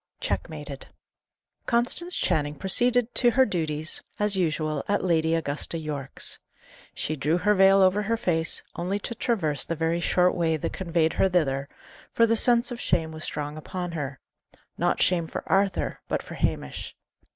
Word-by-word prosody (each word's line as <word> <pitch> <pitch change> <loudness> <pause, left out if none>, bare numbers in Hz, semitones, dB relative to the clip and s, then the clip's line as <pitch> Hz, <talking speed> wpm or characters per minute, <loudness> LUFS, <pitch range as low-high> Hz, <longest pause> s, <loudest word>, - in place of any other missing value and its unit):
CHECKMATED. - - -4 0.8
Constance 255 +9 +1
Channing 145 -1 0
proceeded 245 - +2
to 245 - +5
her 260 +3 +4
duties 155 -6 +2 0.2
as 210 -1 +1
usual 155 -4 -1
at 205 - +1
Lady 165 -2 +2
Augusta 160 +1 -2
Yorke's. 150 -4 -5 0.6
She 155 - -2
drew 150 +4 +1
her 210 +4 +3
veil 195 0 +6
over 190 +2 +3
her 230 +3 0
face, 165 -6 0
only 180 +4 -2
to 205 - -5
traverse 175 - -1
the 165 - -3
very 165 +1 0
short 180 +1 +3
way 165 -2 +1
that - - -4
conveyed 170 -3 0
her 190 - +2
thither, 140 -6 0 0.4
for 230 - +5
the 230 0 +2
sense 240 +2 +3
of 245 - -5
shame 160 -2 0
was 155 0 -8
strong 150 +1 -4
upon 180 +3 -5
her; 145 -5 -5 0.6
not - - 0
shame 170 -3 +2
for - - -5
Arthur, 195 -1 +1
but - - -2
for - - -10
Hamish. 70 - -3
175 Hz, 165 wpm, -26 LUFS, 155-205 Hz, 0.8 s, veil